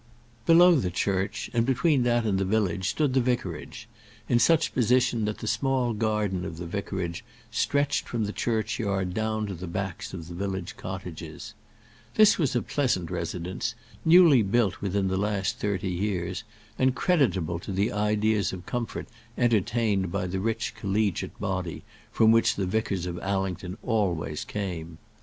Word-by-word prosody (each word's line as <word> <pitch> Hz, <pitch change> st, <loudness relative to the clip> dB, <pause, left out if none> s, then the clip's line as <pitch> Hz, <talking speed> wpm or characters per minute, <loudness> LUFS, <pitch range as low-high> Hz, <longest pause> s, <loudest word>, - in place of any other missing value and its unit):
Below 175 Hz, +2 st, +8 dB
the 95 Hz, -9 st, 0 dB
church, 95 Hz, +2 st, -1 dB
and 115 Hz, -1 st, +3 dB
between 135 Hz, +3 st, +2 dB
that 120 Hz, -1 st, +2 dB
and 100 Hz, -3 st, +1 dB
the -, -, +1 dB
village, 95 Hz, -2 st, 0 dB
stood 150 Hz, -4 st, +1 dB
the 130 Hz, -, +4 dB
vicarage, 120 Hz, -10 st, -3 dB, 0.4 s
in 120 Hz, -, +3 dB
such 165 Hz, +5 st, +3 dB
position 120 Hz, -2 st, +2 dB
that 105 Hz, 0 st, -2 dB
the -, -, -7 dB
small 130 Hz, -3 st, +1 dB
garden 105 Hz, -4 st, 0 dB
of 85 Hz, -4 st, -6 dB
the 85 Hz, -, -6 dB
vicarage 95 Hz, 0 st, -4 dB, 0.3 s
stretched 140 Hz, +4 st, 0 dB
from 115 Hz, -2 st, -1 dB
the 105 Hz, -, -4 dB
churchyard 105 Hz, -5 st, -1 dB
down 110 Hz, +1 st, -1 dB
to 100 Hz, -, -5 dB
the 90 Hz, +1 st, -7 dB
backs 95 Hz, +1 st, -4 dB
of 85 Hz, -4 st, -7 dB
the 85 Hz, -, -8 dB
village 95 Hz, 0 st, -4 dB
cottages. 90 Hz, -4 st, -7 dB, 0.6 s
This 215 Hz, -3 st, +6 dB
was 140 Hz, -6 st, +1 dB
a 120 Hz, -, +1 dB
pleasant 120 Hz, -, 0 dB
residence, 90 Hz, +6 st, -3 dB, 0.3 s
newly 165 Hz, -6 st, +7 dB
built 105 Hz, -1 st, +1 dB
within 100 Hz, 0 st, 0 dB
the 95 Hz, 0 st, 0 dB
last 100 Hz, -1 st, -1 dB
thirty 100 Hz, -2 st, -1 dB
years, 90 Hz, 0 st, -2 dB, 0.4 s
and 130 Hz, 0 st, +3 dB
creditable 100 Hz, -, +1 dB
to 90 Hz, -, -7 dB
the 100 Hz, +3 st, +1 dB
ideas 105 Hz, -1 st, +1 dB
of 90 Hz, -2 st, -8 dB
comfort 120 Hz, -2 st, -4 dB, 0.3 s
entertained 110 Hz, -4 st, +1 dB
by 90 Hz, 0 st, -1 dB
the 95 Hz, +1 st, -2 dB
rich 110 Hz, +3 st, -1 dB
collegiate 100 Hz, -1 st, -1 dB
body 95 Hz, -4 st, -3 dB, 0.3 s
from 110 Hz, 0 st, +5 dB
which 115 Hz, 0 st, +4 dB
the 100 Hz, -, -1 dB
vicars 95 Hz, -2 st, -1 dB
of 90 Hz, -1 st, -4 dB
Allington 95 Hz, -1 st, -2 dB
always 90 Hz, -9 st, -1 dB
came. 85 Hz, -5 st, -5 dB
100 Hz, 160 wpm, -27 LUFS, 95-120 Hz, 0.6 s, Below